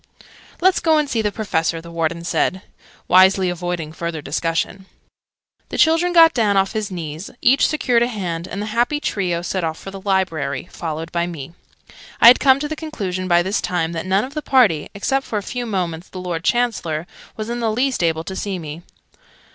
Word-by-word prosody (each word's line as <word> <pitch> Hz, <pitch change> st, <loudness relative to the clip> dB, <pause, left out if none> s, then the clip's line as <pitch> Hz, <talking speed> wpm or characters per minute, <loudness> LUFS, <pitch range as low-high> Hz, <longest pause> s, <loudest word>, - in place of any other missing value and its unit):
"Let's 375 Hz, +1 st, +4 dB
go 320 Hz, -2 st, +3 dB
and 300 Hz, -1 st, +1 dB
see 230 Hz, -5 st, 0 dB
the 210 Hz, -1 st, 0 dB
Professor," 170 Hz, -6 st, -1 dB
the 170 Hz, +1 st, -11 dB
Warden 170 Hz, 0 st, -2 dB
said, 185 Hz, +2 st, 0 dB, 0.4 s
wisely 185 Hz, 0 st, +5 dB
avoiding 175 Hz, -3 st, -4 dB
further 170 Hz, -1 st, -4 dB
discussion. 165 Hz, +6 st, -2 dB, 0.8 s
The -, -, -5 dB
children 330 Hz, +2 st, +4 dB
got 330 Hz, -2 st, +7 dB
down 210 Hz, -5 st, +2 dB
off 195 Hz, 0 st, +2 dB
his 215 Hz, -2 st, -2 dB
knees, 165 Hz, -1 st, -6 dB
each 270 Hz, +3 st, +4 dB
secured 250 Hz, -6 st, +1 dB
a 240 Hz, -, +3 dB
hand, 180 Hz, -7 st, -4 dB
and 200 Hz, -, -4 dB
the 215 Hz, 0 st, -5 dB
happy 245 Hz, +6 st, +1 dB
trio 180 Hz, -, -1 dB
set 185 Hz, +1 st, -2 dB
off 160 Hz, -1 st, -2 dB
for 195 Hz, -, -9 dB
the 195 Hz, 0 st, -9 dB
Library 180 Hz, -8 st, -1 dB
followed 165 Hz, 0 st, -5 dB
by 170 Hz, 0 st, 0 dB
me. 165 Hz, -3 st, -7 dB, 0.7 s
I -, -, +5 dB
had 250 Hz, -, +7 dB
come 270 Hz, -1 st, +5 dB
to 295 Hz, -, -1 dB
the 310 Hz, -, -4 dB
conclusion 200 Hz, -, -4 dB
by 175 Hz, -1 st, +4 dB
this 190 Hz, +3 st, -1 dB
time 170 Hz, -2 st, -1 dB
that 165 Hz, +2 st, -4 dB
none 190 Hz, +2 st, +2 dB
of 265 Hz, -, -7 dB
the 305 Hz, -, -3 dB
party 225 Hz, -, +3 dB
(except, 270 Hz, +7 st, 0 dB
for 220 Hz, -, -3 dB
a 205 Hz, -, -3 dB
few 245 Hz, +3 st, -4 dB
moments, 180 Hz, -4 st, -3 dB
the 185 Hz, -, -8 dB
Lord 175 Hz, -2 st, -4 dB
Chancellor) 185 Hz, -10 st, 0 dB, 0.3 s
was 215 Hz, 0 st, -4 dB
in 240 Hz, -, -3 dB
the 225 Hz, -2 st, 0 dB
least 250 Hz, -2 st, 0 dB
able 160 Hz, -1 st, +1 dB
to 190 Hz, +3 st, -6 dB
see 195 Hz, -1 st, -3 dB
me. 160 Hz, -1 st, -7 dB
190 Hz, 205 wpm, -20 LUFS, 170-235 Hz, 0.8 s, got